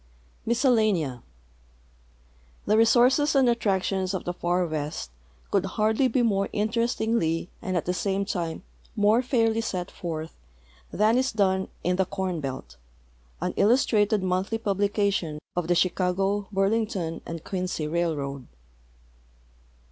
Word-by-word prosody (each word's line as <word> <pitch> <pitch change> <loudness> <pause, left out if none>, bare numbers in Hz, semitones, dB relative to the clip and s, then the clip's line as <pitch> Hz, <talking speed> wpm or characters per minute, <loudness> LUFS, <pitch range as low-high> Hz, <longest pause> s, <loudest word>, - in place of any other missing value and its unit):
MISCELLANEA 215 - +2 1.5
Tlie 210 - +4
resources 250 +6 +4
and 265 -2 +5
attractions 195 -4 0
of 185 - -3
the 175 - -2
fur 175 +1 0
west 150 - -4 0.4
could 195 -1 +1
hardly 220 +5 +3
be 255 -1 +1
more 200 -3 +1
in 210 +1 0
terestingly 220 -8 0
and 185 -1 -2
at 165 - -2
the 180 - 0
same 195 +3 -1
time 170 -4 -3 0.3
more 215 +2 +4
fairly 225 -3 +1
set 185 -5 -4
forth 160 -2 -5 0.6
than 220 +4 +3
is 260 +1 0
done 190 -3 +1 0.2
in 180 +1 +1
21ie 190 -1 0
Corn 190 -3 -2
Belt, 130 - -6 0.6
an - - -1
illustrated 215 -3 +3
monthly 185 +4 0
publication 200 -5 0 0.2
of 175 -2 -1
the 175 - +2
Chicago, 190 +3 +1
Burlington 195 -4 0
and 165 -1 -6
(Quincy 180 -5 -3
Railroad. 145 -5 -2
195 Hz, 125 wpm, -26 LUFS, 175-220 Hz, 1.5 s, and